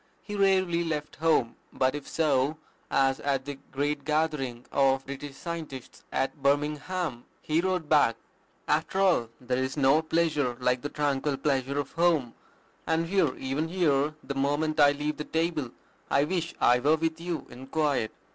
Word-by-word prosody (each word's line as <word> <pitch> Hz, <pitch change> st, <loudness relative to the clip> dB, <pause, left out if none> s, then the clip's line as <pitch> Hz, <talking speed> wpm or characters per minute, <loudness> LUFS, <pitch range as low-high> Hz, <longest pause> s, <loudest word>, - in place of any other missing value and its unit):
He 205 Hz, -, -6 dB
rarely 190 Hz, -4 st, +3 dB
left 150 Hz, -3 st, -4 dB
home; 155 Hz, -7 st, +2 dB
but 130 Hz, 0 st, +1 dB
if 145 Hz, -1 st, -6 dB
so, 150 Hz, -1 st, +1 dB, 0.3 s
as 135 Hz, -1 st, +2 dB
at 135 Hz, -2 st, -1 dB
the 145 Hz, -1 st, -6 dB
great 145 Hz, +2 st, -1 dB
gathering 150 Hz, -5 st, -1 dB
of 135 Hz, -1 st, +2 dB
British 140 Hz, +1 st, -7 dB
Scientists 155 Hz, -4 st, -7 dB
at 135 Hz, +2 st, -2 dB
Birmingham, 150 Hz, 0 st, 0 dB, 0.2 s
he 155 Hz, +2 st, +1 dB
wrote 185 Hz, -3 st, -1 dB
back, 145 Hz, -7 st, +4 dB, 0.5 s
"After 155 Hz, +5 st, 0 dB
all, 175 Hz, -12 st, +3 dB
there 125 Hz, 0 st, -1 dB
is 130 Hz, +3 st, -4 dB
no 140 Hz, +2 st, +4 dB
pleasure 155 Hz, -6 st, 0 dB
like 125 Hz, 0 st, +1 dB
the 145 Hz, -, -4 dB
tranquil 145 Hz, -1 st, 0 dB
pleasure 135 Hz, -1 st, 0 dB
of 145 Hz, -2 st, -2 dB
home; 165 Hz, -8 st, +2 dB, 0.5 s
and 165 Hz, +1 st, +1 dB
here, 165 Hz, -6 st, +1 dB
even 135 Hz, +4 st, -2 dB
here, 155 Hz, -4 st, +1 dB
the 140 Hz, -, -4 dB
moment 145 Hz, +3 st, 0 dB
I 145 Hz, -1 st, +7 dB
leave 150 Hz, +1 st, -3 dB
the 150 Hz, -, -3 dB
table, 160 Hz, -4 st, -1 dB, 0.4 s
I 140 Hz, -, +3 dB
wish 170 Hz, +1 st, -2 dB
I 125 Hz, +1 st, +5 dB
were 145 Hz, +5 st, +4 dB
with 160 Hz, 0 st, -2 dB
you 170 Hz, -5 st, -3 dB
IN 130 Hz, +2 st, -10 dB
QUIET. 145 Hz, -7 st, 0 dB
145 Hz, 165 wpm, -28 LUFS, 135-160 Hz, 0.5 s, I